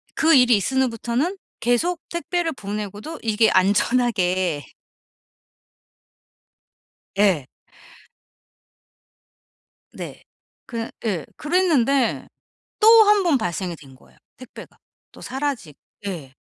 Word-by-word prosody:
그 320 0 +4
일이 250 -3 +6
있은 265 +7 0
후부터는 245 - -2 0.2
계속 275 +9 +1
택배를 345 -1 -2
보내고도 210 - -6
이게 220 0 +3
안전하게 185 - +1 2.5
예. 185 -10 +3 2.5
네. - - -9 0.4
그 230 -1 -5
예 190 -9 -1
그랬는데 295 -7 +1 0.5
또 435 - +6 0.2
1 415 -1 +5
번 325 -7 +2
발생이 175 -3 -3
된 135 -3 -16
거예요 - - -23 0.2
택배가. 255 -1 -13 0.3
또 - - -15
사라지 265 - -4 0.3
예. 150 -9 -6
235 Hz, 180 characters per minute, -22 LUFS, 190-290 Hz, 2.5 s, 일이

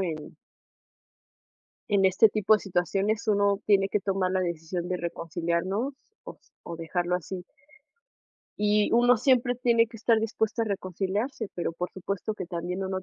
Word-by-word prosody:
en 160 -5 -4 1.5
en 200 -2 +3
este 190 +4 +6
tipo 215 0 +3
de 210 - +1
situaciones 200 +4 -1
uno 200 -1 +3
tiene 195 -2 +4
que 210 - 0
tomar 190 -2 0
la 185 - +1
decisión 170 0 -3
de 185 - -1
reconciliarnos 170 - -2 0.3
o - - -8
s - - -31
o 170 - -6
dejarlo 175 +2 -1
así. 180 +1 -4 1.1
Y 210 0 +2
uno 240 0 +5
siempre 250 -1 +3
tiene 235 -2 +3
que 225 0 -12
estar 225 0 +3
dispuesto 225 +1 -1
a - - +1
reconciliarse, 200 - -3
pero 170 -1 -2
por 175 +2 -4
supuesto 200 +3 -3
que 185 -4 -6
también 180 +1 -4
uno 190 0 -3
195 Hz, 155 wpm, -27 LUFS, 180-220 Hz, 1.5 s, este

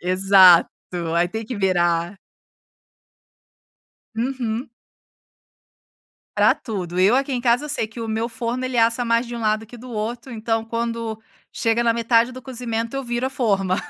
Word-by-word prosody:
Exato. 185 -1 +6 0.5
Aí, 175 +1 +3
tem 220 +3 -5
que 240 +2 -6
virar. 175 -1 0 2.0
Uhum. 240 -1 -3 1.7
Pra - - +5
tudo, 185 -6 -5
eu 200 +7 +5
aqui 275 +1 0
em 245 - -2
casa 245 +4 +2
sei 280 -7 -1
que 230 +2 -11
o 225 - -4
meu 225 +1 -2
forno, 240 +2 -3
ele 255 -1 -2
assa 230 +1 +3
mais 230 +1 +1
de 240 - -6
um - - -5
lado 215 0 0
que 240 +2 -13
do 250 +2 -11
outro, 235 +3 -4
então, 225 0 -1
quando 230 -1 -4 0.3
chega 230 +1 0
na 230 - +3
metade 230 +1 +2
do 255 0 -9
cozimento, 235 -2 -4
eu 275 - -3
viro 240 +1 -2
a - - -1
forma. 195 -8 0
230 Hz, 160 wpm, -22 LUFS, 215-240 Hz, 2.0 s, Exato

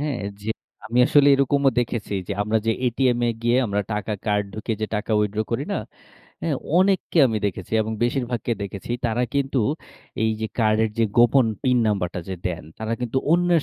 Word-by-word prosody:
হ্যাঁ, 145 -4 -2 0.2
যে, 110 - -6 0.4
আমি 120 +3 -1
আসলে 145 -1 +5
এরকমও 140 0 +3
দেখেছি 115 -3 -3
যে, - - -1
আমরা 110 +2 +1
যে, 115 - +4 0.2
এটিএম 125 0 +2
এ - - +3
গিয়ে 120 +1 +3
আমরা 100 -1 0
টাকা 105 +1 -2
কার্ড 105 -1 +1
ঢুকিয়ে 110 +1 -3
যে, 110 - 0
টাকা 105 +2 -3
withdraw 105 +1 0
করি - - -1
না? - - 0 0.6
অ্যা 165 - -1 0.3
অনেককে 190 -2 +2
আমি 110 -3 -1
দেখেছি 95 -1 -5
এবং 110 +1 -4
বেশিরভাগকে 120 -2 -1
দেখেছি, 100 +2 -6 0.2
তারা 115 +2 0
কিন্তু 135 -1 +1 0.6
এই 110 - +3
যে, 110 - -1
কার্ডের 110 -1 +3
যে, 115 - +4
গোপন 120 +1 +5 0.2
পিন 125 -1 +3
যে, 115 - +2
নাম্বারটা 90 -4 -1 0.3
দেন, 85 -2 -4
তারা 110 +1 -3
কিন্তু 125 +1 0
অন্যের 175 -2 +3
115 Hz, 185 wpm, -23 LUFS, 105-130 Hz, 0.6 s, আসলে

